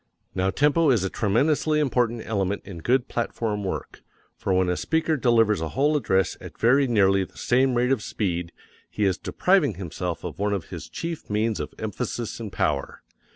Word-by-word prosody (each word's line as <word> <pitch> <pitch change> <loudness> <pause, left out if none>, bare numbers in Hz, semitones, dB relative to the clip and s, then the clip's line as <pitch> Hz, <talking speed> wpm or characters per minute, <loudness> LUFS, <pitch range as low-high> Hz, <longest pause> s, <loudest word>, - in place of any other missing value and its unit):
Now 95 0 +1
tempo 150 +7 +3
is 115 -7 +3
a 95 - -2
tremendously 150 +8 +2
important 120 -5 +1
element 100 -2 -1
in 95 -4 -8
good 125 +8 +1
platform 110 -3 -2
work, 95 - -5 0.3
for - - -3
when 95 0 +3
a 90 - +1
speaker 160 - 0
delivers 115 - +3
a 80 - -2
whole 145 +3 +3
address 95 -9 +1
at - - -10
very 135 +4 +4
nearly 95 -4 +3
the - - -12
same 130 +1 +2
rate 125 +2 +2
of 130 -5 +2
speed 90 -5 -2 0.4
he 105 - -1
is 95 -2 +1
depriving 180 - +2
himself 90 -1 -4
of 85 -2 -6
one 105 0 +1
of 95 -4 -4
his - - -7
chief 165 -1 -5
means 110 +1 0
of - - -5
emphasis 115 +2 -4
and 110 -3 -6
power. 70 -6 -2
110 Hz, 185 wpm, -25 LUFS, 95-130 Hz, 0.4 s, very